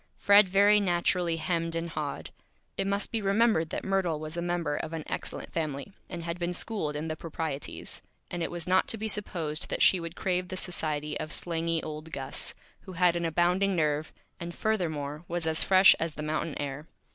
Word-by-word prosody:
Fred 200 Hz, -1 st, +6 dB
very 205 Hz, +2 st, +6 dB
naturally 175 Hz, -2 st, +1 dB
Hemmed 165 Hz, +1 st, -1 dB
and 165 Hz, 0 st, -2 dB
Hawed. 150 Hz, -2 st, -4 dB, 0.4 s
It 195 Hz, -, -1 dB
must 200 Hz, +1 st, 0 dB
be 225 Hz, -, 0 dB
remembered 200 Hz, -4 st, +3 dB
that -, -, -3 dB
Myrtle 190 Hz, -5 st, +1 dB
was 155 Hz, +1 st, -6 dB
a 170 Hz, -, -2 dB
member 170 Hz, -4 st, -1 dB
of 160 Hz, -, -4 dB
an 160 Hz, -1 st, -3 dB
Excellent -, -, -4 dB
Family, 155 Hz, +2 st, -3 dB, 0.2 s
and 170 Hz, -1 st, -5 dB
had 170 Hz, +1 st, -4 dB
been 175 Hz, 0 st, -1 dB
schooled 170 Hz, -8 st, -2 dB
in 150 Hz, +2 st, -3 dB
the 155 Hz, -, -2 dB
Proprieties, 155 Hz, -3 st, -5 dB, 0.3 s
and 175 Hz, -, -3 dB
it 165 Hz, -, 0 dB
was 175 Hz, -1 st, -5 dB
not 185 Hz, +1 st, +3 dB
to 225 Hz, -, 0 dB
be 220 Hz, +1 st, -2 dB
supposed 175 Hz, -6 st, -2 dB
that -, -, +2 dB
she 185 Hz, -, +6 dB
would 165 Hz, 0 st, -6 dB
crave 180 Hz, -1 st, 0 dB
the 185 Hz, -, -5 dB
Society 150 Hz, -5 st, -3 dB
of 155 Hz, -, -4 dB
slangy 165 Hz, -1 st, 0 dB
old 155 Hz, +1 st, -6 dB
Gus, 135 Hz, -3 st, -3 dB, 0.2 s
who 190 Hz, -, -10 dB
had 175 Hz, 0 st, +4 dB
an 170 Hz, 0 st, -1 dB
abounding 180 Hz, +4 st, +2 dB
Nerve, 155 Hz, -2 st, 0 dB, 0.3 s
and 170 Hz, -1 st, -6 dB
furthermore 155 Hz, -8 st, -1 dB
was 170 Hz, -1 st, -2 dB
as 160 Hz, 0 st, +2 dB
Fresh 190 Hz, 0 st, +8 dB
as 165 Hz, -1 st, -2 dB
the 150 Hz, -, -5 dB
Mountain 155 Hz, 0 st, -2 dB
Air. 145 Hz, +2 st, -4 dB
170 Hz, 200 wpm, -29 LUFS, 155-185 Hz, 0.4 s, Fresh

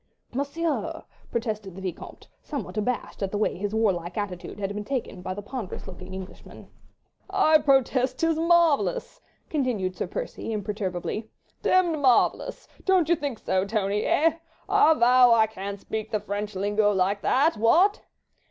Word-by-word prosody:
"Monsieur!" 290 Hz, +5 st, -2 dB, 0.3 s
protested 215 Hz, -5 st, -3 dB
the 190 Hz, -, -8 dB
Vicomte, 180 Hz, -3 st, -7 dB
somewhat 285 Hz, -7 st, -6 dB
abashed 220 Hz, +2 st, -2 dB
at 195 Hz, -, 0 dB
the 205 Hz, -, -3 dB
way 210 Hz, -, 0 dB
his 205 Hz, +3 st, -3 dB
warlike 180 Hz, -5 st, 0 dB
attitude 195 Hz, -4 st, -5 dB
had 200 Hz, 0 st, -2 dB
been 210 Hz, 0 st, -4 dB
taken 230 Hz, -6 st, -4 dB
by 185 Hz, 0 st, -4 dB
the 205 Hz, -, -7 dB
ponderous 230 Hz, -3 st, -6 dB
looking 190 Hz, 0 st, -9 dB
Englishman. 190 Hz, 0 st, -10 dB, 0.6 s
"I 350 Hz, -5 st, +4 dB
protest 265 Hz, -2 st, +2 dB
'tis 330 Hz, -1 st, +1 dB
marvellous!" 340 Hz, -, +2 dB, 0.3 s
continued 235 Hz, -11 st, -1 dB
Sir -, -, -3 dB
Percy, -, -, -5 dB
imperturbably, 210 Hz, 0 st, -3 dB, 0.3 s
"demmed 350 Hz, -4 st, +3 dB
marvellous! 270 Hz, -, +2 dB, 0.2 s
Don't 370 Hz, -4 st, +3 dB
you 345 Hz, -, +5 dB
think 285 Hz, -6 st, -4 dB
so, 190 Hz, -2 st, 0 dB
Tony—eh? 215 Hz, +10 st, +1 dB, 0.3 s
I 320 Hz, -, +5 dB
vow 245 Hz, 0 st, +6 dB
I 220 Hz, -1 st, +5 dB
can't 200 Hz, -2 st, -6 dB
speak 220 Hz, +2 st, -5 dB
the 215 Hz, -, 0 dB
French 205 Hz, +1 st, -4 dB
lingo 205 Hz, +2 st, +2 dB
like 195 Hz, +1 st, +1 dB
that. 295 Hz, +6 st, +3 dB
What?" 345 Hz, -, +4 dB
220 Hz, 150 wpm, -26 LUFS, 200-285 Hz, 0.6 s, vow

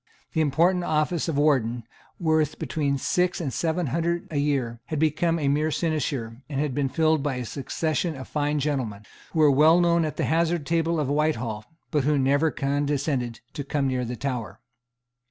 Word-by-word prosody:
The 160 Hz, -, +2 dB
important 170 Hz, +5 st, +2 dB
office 155 Hz, +1 st, 0 dB
of 160 Hz, -4 st, -1 dB
Warden, 125 Hz, -6 st, +2 dB, 0.4 s
worth 155 Hz, -3 st, +1 dB
between 140 Hz, -3 st, -1 dB
six 180 Hz, +6 st, 0 dB
and 145 Hz, -7 st, -3 dB
seven 170 Hz, +1 st, 0 dB
hundred 170 Hz, +1 st, -1 dB
a 150 Hz, -, -2 dB
year, 135 Hz, -5 st, 0 dB
had 155 Hz, -, -3 dB
become 160 Hz, +2 st, +1 dB
a 150 Hz, -3 st, -1 dB
mere 150 Hz, +3 st, +2 dB
sinecure, 140 Hz, -8 st, -2 dB
and 140 Hz, -2 st, -2 dB
had 145 Hz, -2 st, 0 dB
been 140 Hz, 0 st, 0 dB
filled 155 Hz, +2 st, +2 dB
by 140 Hz, -2 st, -1 dB
a 125 Hz, -1 st, -4 dB
succession 155 Hz, +5 st, -2 dB
of 130 Hz, -1 st, -8 dB
fine 150 Hz, 0 st, -1 dB
gentlemen, 130 Hz, -8 st, -2 dB, 0.3 s
who -, -, -5 dB
were 150 Hz, -2 st, +6 dB
well 155 Hz, +5 st, +6 dB
known 170 Hz, -1 st, +3 dB
at 155 Hz, -, -3 dB
the -, -, 0 dB
hazard 165 Hz, 0 st, +1 dB
table 165 Hz, 0 st, +1 dB
of 150 Hz, -, 0 dB
Whitehall, 130 Hz, -8 st, -1 dB, 0.3 s
but 150 Hz, -3 st, +1 dB
who 150 Hz, +1 st, +2 dB
never 140 Hz, +4 st, +3 dB
condescended 140 Hz, -4 st, -1 dB
to 145 Hz, -, -4 dB
come 140 Hz, 0 st, -1 dB
near 130 Hz, -1 st, -1 dB
the 125 Hz, +1 st, -4 dB
Tower. 120 Hz, -7 st, -4 dB
150 Hz, 185 wpm, -25 LUFS, 135-160 Hz, 0.4 s, were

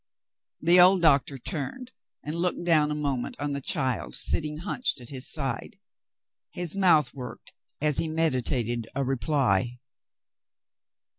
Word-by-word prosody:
The 175 Hz, +3 st, +6 dB
old 180 Hz, 0 st, +6 dB
doctor 140 Hz, -3 st, +3 dB
turned 175 Hz, -, -5 dB, 0.3 s
and 150 Hz, -, -4 dB
looked 175 Hz, +1 st, -1 dB
down 155 Hz, -3 st, +3 dB
a 150 Hz, -, -2 dB
moment 140 Hz, -4 st, -2 dB
on 145 Hz, 0 st, -3 dB
the 140 Hz, 0 st, -3 dB
child 130 Hz, -, -1 dB
sitting 150 Hz, -, 0 dB
hunched 190 Hz, -, +1 dB
at 120 Hz, -, -7 dB
his 130 Hz, -1 st, -1 dB
side. 135 Hz, -6 st, -3 dB, 0.7 s
His 175 Hz, 0 st, -3 dB
mouth 165 Hz, -9 st, +3 dB
w^orked 125 Hz, -3 st, -10 dB, 0.3 s
as 150 Hz, -1 st, +1 dB
he 165 Hz, -, -1 dB
meditated 125 Hz, -7 st, -1 dB
a 140 Hz, -, 0 dB
reply. 125 Hz, -4 st, 0 dB
145 Hz, 135 wpm, -26 LUFS, 130-165 Hz, 0.7 s, The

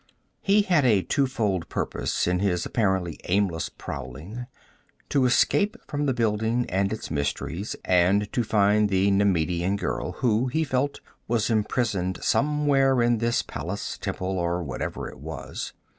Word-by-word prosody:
He 205 Hz, +1 st, +4 dB
had 175 Hz, -7 st, +3 dB
a 105 Hz, -7 st, +4 dB
twofold 110 Hz, -, 0 dB
purpose -, -, -1 dB
in 90 Hz, 0 st, +1 dB
his 90 Hz, -3 st, 0 dB
apparently 95 Hz, -7 st, 0 dB
aimless 90 Hz, -3 st, 0 dB
prowling: 75 Hz, -, -7 dB, 0.6 s
to 135 Hz, -3 st, +3 dB
escape 205 Hz, -, +2 dB
from 145 Hz, 0 st, -1 dB
the 135 Hz, -, +2 dB
building 115 Hz, +1 st, +1 dB
and 95 Hz, +2 st, +1 dB
its 110 Hz, -, -5 dB
mysteries, 80 Hz, +7 st, -2 dB
and 95 Hz, +3 st, +3 dB
to 120 Hz, -, +1 dB
find 105 Hz, -1 st, +3 dB
the 95 Hz, +1 st, +3 dB
Nemedian 90 Hz, -2 st, +2 dB
girl -, -, -3 dB
who, 120 Hz, +1 st, +1 dB
he 160 Hz, +6 st, 0 dB
felt, 140 Hz, 0 st, -1 dB, 0.3 s
was 115 Hz, -1 st, +1 dB
imprisoned 105 Hz, -4 st, 0 dB
somewhere 140 Hz, -3 st, +3 dB
in 120 Hz, -1 st, +2 dB
this 115 Hz, +1 st, +1 dB
palace, -, -, -5 dB
temple, 95 Hz, 0 st, -3 dB
or 85 Hz, 0 st, -1 dB
whatever 70 Hz, -5 st, -4 dB
it -, -, -11 dB
was. 75 Hz, -1 st, -6 dB
105 Hz, 145 wpm, -25 LUFS, 90-125 Hz, 0.6 s, He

